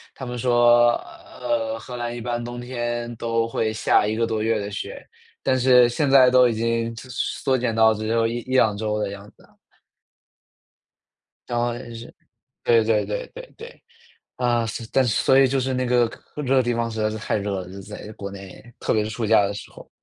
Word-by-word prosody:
他 130 - -7
们 125 0 -5
说， 120 0 +5 0.5
呃， 115 -2 -1
荷 125 +2 -8
兰 120 0 -4
一 120 - -6
般 120 0 -3
冬 120 0 -6
天 120 -1 -4
都 115 0 0
会 110 -1 -1
下 105 -1 +2
一 110 - -1
个 115 +1 +1
多 110 -1 -2
月 110 0 +1
的 100 0 -5
雪， 100 - -6 0.4
但 130 -1 +2
是 125 -1 +6
现 140 +4 0
在 135 -2 +7
都 125 -1 +6
已 120 - 0
经 115 +1 -1
缩 130 +2 -2
减 120 -2 -1
到 110 0 +5
只 110 0 -5
有 115 0 +2
1 115 +1 -1
1-2 120 -4 +2
周 105 0 -2
的 105 - -2
样 100 +1 -10
子 - - -23
了。 - - -23 2.0
然 120 - -1
后 120 0 0 0.2
是 115 +1 -10 0.5
对 115 -1 +4
对 110 -1 +2
对 - - -4
对 - - -10
对， 475 +1 -12 0.5
啊， 120 -2 +1
所 115 +1 -5
但 135 - +3
所 130 +4 +3
以 135 - +6
就 135 +1 0
是 130 +1 -1
那 130 0 -1
个 120 -1 +2 0.3
这 150 - -3
个 130 0 +3
地 120 0 0
方 115 0 -2
实 110 -1 -4
在 110 - +1
是 110 - -5
太 105 - -2
热 100 -2 -3
了， - - -9
就 - - -11
是 100 0 -9
在 105 +1 -9
国 100 -1 -7
内， 95 -1 -11 0.2
特 - - 0
别 110 - +2
是 - - -4
暑 110 +1 -3
假 110 -1 +5
的 100 - -3
时 100 - -9
候。 - - -14
115 Hz, 230 characters per minute, -23 LUFS, 110-125 Hz, 2.0 s, 在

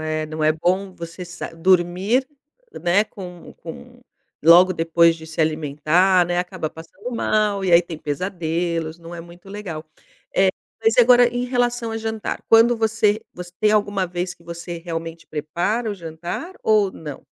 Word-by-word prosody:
É, 155 0 -2
não 155 0 -5
é 155 - +4
bom 185 +4 -1
você 170 +2 -8
sa 175 +1 -7
dormir, 185 +8 +2 0.6
né, 185 +4 +3
com 180 -5 -10
com - - -11 0.4
logo 175 +3 +7
depois 165 0 +3
de 160 - -11
se 160 0 -5
alimentar, 155 +4 +2
né, 175 0 -1
acaba 180 -3 -3
passando 175 +10 -10
mal 210 -4 0
e 180 - +1
aí 170 - +8
tem 170 -2 -7
pesadelos, 165 0 -3
não 170 +1 -10
é 170 - -7
muito 175 +3 -14
legal. 190 -6 -6 0.5
Eh, 190 0 +4 0.3
mas 225 0 +3
e - - +8
agora 245 0 +7
em 245 +1 -2
relação 245 -2 0
a 225 - -3
jantar, 220 -1 -4
quando 230 +1 +6
você 220 -1 +1
você 180 0 -9
tem 215 -1 +3
alguma 205 -3 +1
vez 175 0 -4
que - - -24
você 170 0 -7
realmente 165 0 -6
prepara 175 +10 -2
o 205 - -3
jantar 175 - -6
ou 210 -3 +3
não? 150 -3 -9
180 Hz, 170 wpm, -22 LUFS, 165-210 Hz, 0.6 s, aí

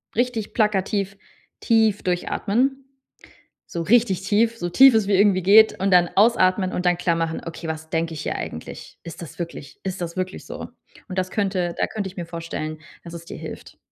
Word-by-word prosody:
richtig 235 -2 -1
plakativ 200 -2 0 0.4
tief 220 -3 +2
durchatmen. 225 +9 0 0.8
So 170 - -4
richtig 205 -1 +3
tief, 225 +4 +2
so 175 - -3
tief 265 +8 +7
es 215 -3 +2
wie 205 - +3
irgendwie 200 -2 +4
geht 215 +4 +6
und 195 +1 +1
dann 175 -1 +5
ausatmen 185 -3 +3
und 180 - -2
dann 175 0 +3
klarmachen: 165 -2 -1
„Okay, 165 0 -7
was 160 0 -5
denke 165 0 -1
ich 150 - -6
hier - - -2
eigentlich? - - -8
Ist 165 -1 -9
das 165 - -10
wirklich 165 -5 -7
ist 190 -1 -4
das 170 0 -5
wirklich 185 0 -4
so?” - - -7 0.4
Und 185 -1 -5
das 185 0 -1
könnte 190 -4 -1
da - - +2
könnte 210 -3 -4
ich 190 - -14
mir 175 - -4
vorstellen, 165 -2 -5 0.3
dass 170 -1 -9
es 170 0 -8
dir - - -8
hilft. - - -9
185 Hz, 190 wpm, -23 LUFS, 170-210 Hz, 0.8 s, tief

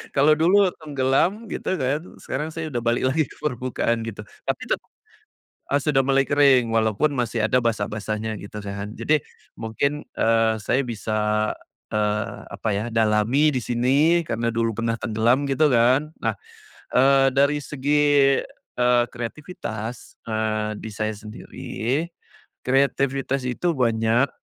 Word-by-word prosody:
kalau 145 +3 +5
dulu, 180 +5 +4
tenggelam 150 - +1
gitu 190 - -2
kan, 135 -1 0 0.2
sekarang 150 +4 -3
saya 160 -2 -4
sudah 120 - -1
balik 120 +2 +1
lagi 155 0 +1
ke - - -15
permukaan 125 -4 -1
gitu. 105 -2 -6
Tapi 105 - -5
tetap, - - -1 0.9
eee, 140 - +3
sudah 145 -1 +2
mulai 135 +1 +2
kering, 130 -5 +4
walaupun 110 +6 +2
masih 120 -4 0
ada 125 +3 +2
basah-basahnya, 110 -1 -2
gitu 100 +1 -9
kan. 100 +2 -6
Jadi, 155 -1 +2 0.3
mungkin, 140 +6 -3
eee, 115 0 +3
saya 115 +5 0
bisa 110 -3 -1 0.4
eee, 105 0 -1 0.2
apa 110 - -3
ya, 105 +3 -1
dalami 115 +7 +3
di - - 0
sini, 135 +9 +2
karena 115 -3 -1
dulu 115 0 0
pernah 115 0 0
tenggelam, 120 +5 +1
gitu 150 +3 +3
kan. 125 +6 +3
Nah, 115 -1 0 0.6
eee, 135 +1 +5
dari 140 +2 +3
segi, 145 -1 +3 0.4
eee, 125 0 +4
kreativitas, 120 - -6 0.2
eee, 110 -1 -1
di 110 - -6
saya 110 +1 -2
sendiri, 110 +5 -4 0.6
kreativitas 135 0 +1
itu 170 +8 0
banyak 115 +1 +2
125 Hz, 135 wpm, -23 LUFS, 110-140 Hz, 0.9 s, kalau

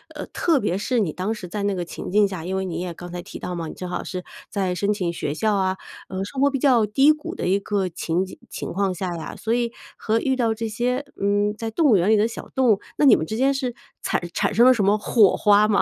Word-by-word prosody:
呃， 300 - -5
特 330 -4 +1
别 195 -4 -1
是 235 +4 0
你 185 -7 0
当 185 +7 -2
时 200 -5 -8
在 205 +1 -3
那 200 -1 0
个 180 - -2
情 170 - -7
境 210 +2 +4
下， 180 -4 -6
因 190 +1 -2
为 190 - -1
你 170 -3 -4
也 180 -1 -4
刚 175 +1 -9
才 175 0 -5
提 195 - -9
到 180 - -5
嘛， 165 -2 -4
你 - - -7
正 180 -1 -7
好 175 - -3
是 180 -1 -5 0.3
在 190 -3 -1
申 200 +3 0
请 180 -4 -2
学 150 -3 -3
校 215 +6 +1
啊， 190 -1 0 0.3
呃， 190 0 -3
生 265 +6 -4
活 280 - +5
比 275 - -1
较 245 -6 +4
低 270 +8 +5
谷 305 -1 -4
的 - - -4
一 195 +2 +3
个 200 -2 -1
情 175 +1 -1
景 190 - -11
情 - - -5
况 195 0 0
下 180 -1 -3
呀， 160 - -7
所 225 +1 -2
以 235 -1 0 0.3
和 220 +1 0
遇 265 - +1
到 230 -3 +1
这 225 +1 -4
些， 250 +5 -1 0.2
嗯， 205 +1 +2
在 225 0 -3
动 315 +7 +1
物 210 - +6
园 180 +4 +2
里 220 - +6
的 215 +1 +3
小 230 - -8
动 260 -3 +4
物， 200 - +2 0.2
那 295 - +3
你 270 - +8
们 160 - -2
之 220 - -4
间 270 +3 +2
是 255 -3 -3 0.3
惨 - - -1
产 - - 0
生 235 +4 +5
了 255 - +8
什 215 -5 0
么 205 +2 +4
火 210 -2 +4
花 210 0 +4
吗？ 205 -2 +3
205 Hz, 305 characters per minute, -23 LUFS, 185-230 Hz, 0.3 s, 你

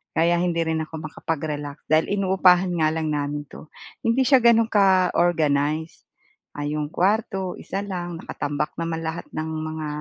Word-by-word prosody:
kaya 170 +2 +3
hindi 170 -1 0
rin 160 0 0
ako 160 - -28
makapag-relax 150 -2 -4
dahil 155 +1 +4
inuupahan 190 -2 +4
nga 155 -1 +3
lang 160 -1 -1
namin 145 0 -3
'to. - - -11 0.4
Hindi 230 +3 +3
siya 265 -2 +6
gano'n 230 -1 +5
ka-organize. 165 -5 +2 0.6
Ah, 145 - -3
'yong 150 0 -2
kwarto 200 +1 +1 0.2
isa 195 - -4
lang, 175 -2 -3
nakatambak 145 +1 -3
naman 165 -1 -2
lahat 160 +1 -4
ng 155 - -2 0.2
mga, 155 -1 -5
160 Hz, 150 wpm, -23 LUFS, 150-185 Hz, 0.6 s, siya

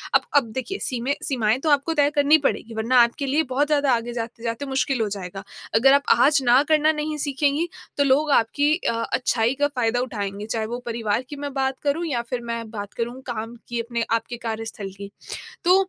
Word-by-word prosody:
अब - - +6
अब 245 -6 +3
देखिए, 260 - -4
सी 245 -2 -3 0.2
सीमाएँ 230 -3 +1
तो 310 - -1
आपको 290 +3 +2
तय 290 -2 +3
करनी 290 +2 +6
पड़ेंगी 225 0 -4
वरना 235 +3 +4
आपके 235 +5 -1
लिए 290 +4 +2
बहुत 290 +3 +2
ज़्यादा 290 -2 +2
आगे 235 0 -2
जाते-जाते 230 +2 -4
मुश्किल 265 -2 0
हो 220 - +1
जाएगा। 195 -1 -6 0.3
अगर 270 +5 +6
आप 280 0 +4
आज 280 +3 +4
ना 245 +3 +6
करना 310 0 +4
नहीं 305 0 -3
सीखेंगी 290 +3 0 0.3
तो 285 - +4
लोग 285 +2 +3
आपकी 285 +5 +3
अ, 295 - -1 0.2
अच्छाई 240 -1 +1
का 290 - +5
फ़ायदा 245 -4 0
उठाएँगे 205 -4 -4
चाहे 220 0 -2
वो 240 +3 -4
परिवार 230 -1 -1
की 290 - -6
मैं 285 -1 -5
बात 265 -1 -1
करूँ 300 +4 0
या 250 -6 -1
फ़िर 250 -1 -2
मैं 230 -1 -4
बात 205 -2 -6
करूँ 240 +2 -4
काम 230 -1 -4
की 240 0 -3
अपने 235 0 -2
आपके 230 +1 -2
कार्यस्थल 220 -2 -4
की। 200 0 -8 0.6
तो 360 +2 +6
250 Hz, 205 wpm, -23 LUFS, 230-285 Hz, 0.6 s, अब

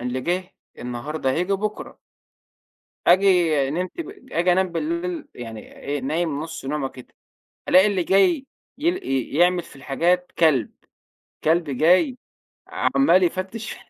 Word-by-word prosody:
اللي 125 +1 -3
جِه 180 +5 -2 0.3
النهارده 130 +4 -3
هييجي 180 +8 0
بُكره. 210 +2 -3 1.1
آجي 175 -7 +4
نمت 180 - -3
ب 335 - -6 0.2
آجي 175 +2 +3
أنام 190 +1 +2
بالليل 170 +2 -3
يعني 115 -3 -9
إيه، 145 0 -3
نايم 150 +2 -1
نُص 160 -3 -7
نومة 140 0 -2
كده، 125 -1 -14 0.6
ألاقى 185 +2 +7
اللي 195 -3 0
جاي 265 - +3 0.3
يل 340 +6 +1
ي 135 +2 -1
يعمل 175 0 +3
في - - -15
الحاجات 170 +7 0
كلب، 145 -9 +3 0.7
كلب 160 -1 +2
جاي 180 - +3 0.5
عَمّال 275 -9 +3
يفتِّش 190 +5 -2
170 Hz, 130 wpm, -23 LUFS, 140-185 Hz, 1.1 s, ألاقى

